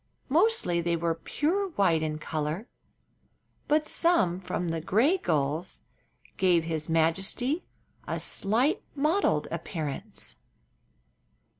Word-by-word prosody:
Mostly 320 - +3
they 170 0 0
were 165 0 0
pure 325 - -1
white 170 - +3
in 155 -1 -2
color, 155 - -3 1.0
but 305 +1 +3
some 305 - +3
from 180 -1 -3
the 165 0 -2
gray 245 - +3
gulls 155 - 0 0.6
gave 175 -3 +3
his 160 -1 -3
majesty 195 - +1 0.4
a - - -2
slight 245 - +1
mottled 310 +8 +2
appearance. 140 - -5
180 Hz, 105 wpm, -28 LUFS, -, 1.0 s, Mostly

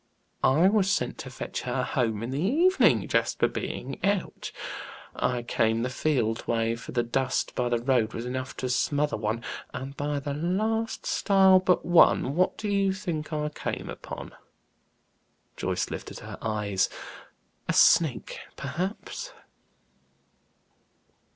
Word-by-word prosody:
"I 155 +8 +5
was 200 -1 +3
sent 125 -12 0
to 130 - -6
fetch 125 - -5
her 125 0 -1
home 115 -4 -1
in 120 - -4
the 140 +3 -2
evening, 330 - +4
Jasper - - +2
being - - -5
out. 200 -2 -1 0.6
I 125 -1 0
came 115 -2 +1
the 125 - -2
field 125 -6 0
way; 115 0 +1
for 115 - -9
the 120 -1 +1
dust 130 +3 -1
by 125 -1 0
the 120 - +2
road 120 -2 +1
was 115 - -4
enough 130 +1 -4
to 130 - -2
smother 145 +3 +1
one, 110 +2 -2 0.3
and 135 +1 -6
by 145 0 -2
the 140 0 -4
last 215 +8 -1
stile 190 -2 +5
but 185 -1 +2
one, 170 -5 +5
what 185 +2 +2
do 215 - -4
you 200 -1 +2
think 170 -6 -4
I 150 -1 -1
came 150 - -5
upon?" - - -8 1.2
Joyce - - -2
lifted - - -6
her - - -8
eyes. 105 -3 0 0.8
"A - - +3
snake - - +4 0.2
perhaps." 195 - -4
140 Hz, 140 wpm, -27 LUFS, 120-185 Hz, 1.2 s, I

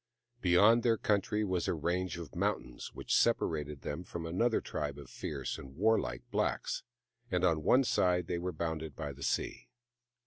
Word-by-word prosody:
Beyond 105 +7 +6
their 115 -1 +3
country 105 +1 +1
was 95 -4 0
a - - +1
range 90 +3 -1
of 85 -4 -8
mountains - - -2
which - - 0
separated 75 -3 +1
them 75 +5 -4
from 85 -2 -6
another 110 +8 +2
tribe 75 -1 -4
of 70 - -11
fierce 70 -3 -4
and 65 0 -11
warlike 100 - +1
blacks, - - 0 0.5
and 90 -3 0
on 80 -4 +3
one 130 - +5
side 90 -6 +2
they 85 +1 -2
were 90 +1 -2
bounded 80 -2 -3
by 75 -3 -4
the 70 - -14
sea. - - -2
85 Hz, 170 wpm, -33 LUFS, 75-95 Hz, 0.5 s, Beyond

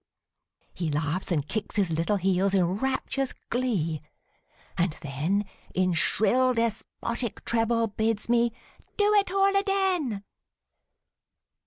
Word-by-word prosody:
He 170 -3 -2
laughs 160 +5 -1
and 150 -4 0
kicks 215 +5 -3
his 195 -5 +1
little 165 +6 +1
heels 190 +1 +2
in 185 -2 +4
rapturous 265 +1 -1 0.2
glee, 190 - 0 0.7
and 175 -2 +1
then 155 +9 0 0.3
In 185 -1 +2
shrill, 250 +9 +3
despotic 230 +1 -3
treble 230 0 +2
bids 220 0 -1
me 235 0 +3 0.5
"do 415 0 +4
it 405 -2 +4
all 390 +1 +3
aden!" 380 - +1
220 Hz, 115 wpm, -27 LUFS, 180-255 Hz, 0.7 s, in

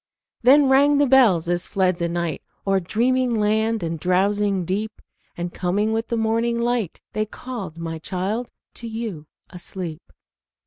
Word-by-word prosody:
Then 275 +3 +6
rang 280 +2 +5
the 290 - +4
bells 240 -11 +4
as 175 0 0
fled 185 -2 +1
the 170 -1 -1
night 170 -3 -2 0.2
O'er 195 -1 +2
dreaming 240 +6 +1
land 220 0 +1
and 165 -1 -3
drowsing 195 +2 +1
deep, 210 +5 -3 0.4
And 175 0 -4
coming 205 +5 0
with 225 +1 -1
the 235 - -1
morning 230 +1 +1
light, 235 -5 -1
They 215 +1 -1
called, 210 -9 -7
my 165 -1 -5
child, 195 +8 -3 0.2
to 235 - -8
you 220 -9 -5 0.2
asleep. 175 -2 -5
210 Hz, 150 wpm, -22 LUFS, 175-235 Hz, 0.4 s, Then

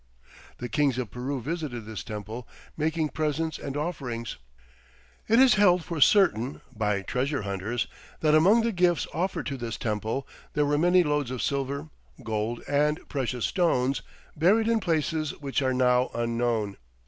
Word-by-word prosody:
The 125 - -5
kings 140 -1 +1
of 120 -6 -3
Peru 130 +4 -3
visited 140 -4 -4
this 110 0 -6
temple 110 +2 -6 0.3
making 155 0 0
presents 155 +1 -1
and 140 +1 -5
offerings.... 135 -8 -4 0.9
It 225 - +4
is 260 -1 +7
held 180 -4 +5
for 165 -3 -4
certain 135 - +4
[by 105 -2 0
treasure 135 +3 -1
hunters!] 100 +4 -2 0.4
that 155 -1 +3
among 190 +9 +6
the 230 +1 +1
gifts 175 -3 +2
offered 175 -2 -1
to 140 - -3
this 120 -3 -4
temple 110 +4 -2 0.3
there 150 - +2
were 145 0 +1
many 180 +2 +5
loads 150 -4 0
of 130 -1 -3
silver, 140 +2 -2 0.3
gold, 110 +1 -2
and 150 +1 +1
precious 125 -3 -1
stones 135 - +1 0.3
buried 200 +8 +3
in 230 -1 +3
places 160 -4 -1
which 140 -1 -1
are 130 -1 +1
now 125 0 +3
unknown. 115 -3 -1
140 Hz, 155 wpm, -27 LUFS, 120-160 Hz, 0.9 s, is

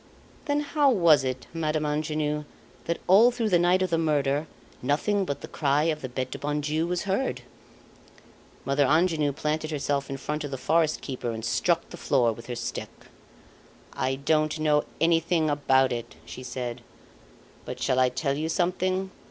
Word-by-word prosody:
"Then 290 0 +1
how 295 -1 +2
was 170 - +5
it, 130 -1 -3
Madame 155 -2 -1
Angenoux, 150 0 -1 0.4
that 170 - -1
all 210 +6 +7
through 235 -3 -1
the 175 -3 +4
night 180 +2 +3
of 185 - -2
the 165 - +2
murder 145 -1 +1 0.3
nothing 190 +10 +1
but 140 -5 -4
the - - -7
cry 145 0 +1
of 155 - -9
the 130 - -5
Bete 130 +1 -4
du 140 - -6
bon 145 +2 -1
Dieu 155 +3 -1
was 180 0 -1
heard?" 200 +6 -1 1.2
Mother 140 +1 +2
Angenoux 155 -1 +2
planted 155 +2 -2
herself 140 -2 -1
in 135 - -4
front 150 +3 -3
of 145 - -4
the 135 - -4
forest 160 +3 +1
keeper 130 -3 -4
and 110 -1 -4
struck 170 +8 +1
the 175 - -8
floor 125 -8 +2
with 115 +1 -12
her 125 - -4
stick. 120 - -4 1.0
"I 130 +1 -1
don't 155 +3 +1
know 150 -1 +2
anything 165 -1 +2
about 135 -2 +3
it," 120 -1 -5
she - - -9
said. 125 -1 -5 0.8
"But 125 - -7
shall 130 0 +1
I 130 0 +4
tell 140 +2 -1
you 155 +2 -2
something? 185 +2 0
150 Hz, 175 wpm, -26 LUFS, 135-170 Hz, 1.2 s, all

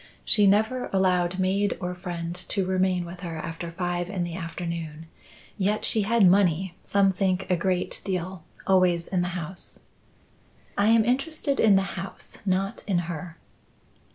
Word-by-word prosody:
She 205 -2 +4
never 220 +6 +2
allowed 185 -2 +2
maid 195 +2 +1
or 180 -1 -3
friend 175 -2 -5
to 185 +2 -2
remain 185 -1 +1
with 175 +1 -9
her 170 -3 -5
after 165 +1 -5
five 175 0 -2
in 190 -3 -2
the 175 -1 -4
afternoon; 165 -2 -5 0.5
yet 205 +2 +1
she 220 - +4
had 220 0 +4
money 185 -1 +3
some 195 -1 +2
think 185 0 0
a - - +5
great 180 +1 -1
deal 185 -2 -3 0.2
always 180 -3 +3
in 185 -2 0
the 175 - 0
house." 175 +2 -5 0.9
"I 200 - +2
am 225 -1 +5
interested 280 +3 0
in 210 -3 +6
the 195 - +4 0.2
house, 195 - -9
not 195 +3 0
in 195 -4 +2
her." 170 0 -7
185 Hz, 155 wpm, -26 LUFS, 175-195 Hz, 0.9 s, in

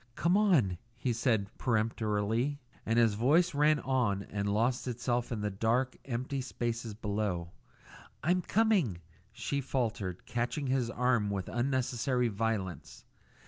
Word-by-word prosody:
"Come 170 +3 +2
on!" 155 - +3 0.2
he 120 0 0
said 110 -4 0
peremptorily, 110 +2 0 0.3
and 115 +1 +2
his 115 -3 +5
voice 150 +12 +3
ran 150 +1 +4
on 120 -7 +1
and 100 0 -1
lost 120 +5 +1
itself 120 0 -1
in 110 -3 -2
the 105 0 -1
dark, 115 +6 +1
empty 130 +2 -2
spaces 120 -3 -3
below. 100 -6 -2 0.7
"I'm 180 +5 +2
coming," 195 - +2 0.3
she 140 +4 -2
faltered, 110 -9 -2
catching 120 +4 -2
his 130 -2 +1
arm 120 -3 +1
with 100 -2 -3
unnecessary 125 0 0
violence. 100 -7 -3
120 Hz, 130 wpm, -31 LUFS, 105-130 Hz, 0.7 s, his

